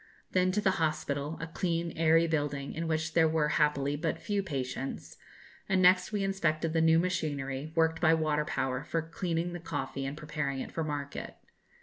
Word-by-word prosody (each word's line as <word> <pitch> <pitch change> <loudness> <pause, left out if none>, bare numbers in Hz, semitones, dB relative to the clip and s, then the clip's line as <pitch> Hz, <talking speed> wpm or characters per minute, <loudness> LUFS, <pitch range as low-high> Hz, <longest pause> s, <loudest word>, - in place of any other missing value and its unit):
Then 185 0 +3
to 210 - +1
the 190 -2 +2
hospital, 150 -1 -1
a 165 - -3
clean, 170 0 -2
airy 165 +1 +4
building, 145 -3 -1
in 165 +1 -3
which 160 0 -1
there 165 -1 +5
were 155 -1 +1
happily 145 -2 +2
but 160 +2 -1
few 205 -1 -1
patients, 135 -6 -4 0.5
and 190 - +3
next 185 +1 +5
we 205 -2 0
inspected 165 -5 0
the 165 - +3
new 160 0 +5
machinery, 155 -5 -1
worked 160 -1 +2
by 165 -1 +5
water 155 -2 +1
power, 130 -2 -2
for 165 +1 -2
cleaning 170 +1 -2
the 175 - -5
coffee 145 -4 -4
and 140 +2 -5
preparing 150 -3 -3
it - - -5
for 165 - -2
market. 145 -2 -4
160 Hz, 185 wpm, -30 LUFS, 145-170 Hz, 0.5 s, there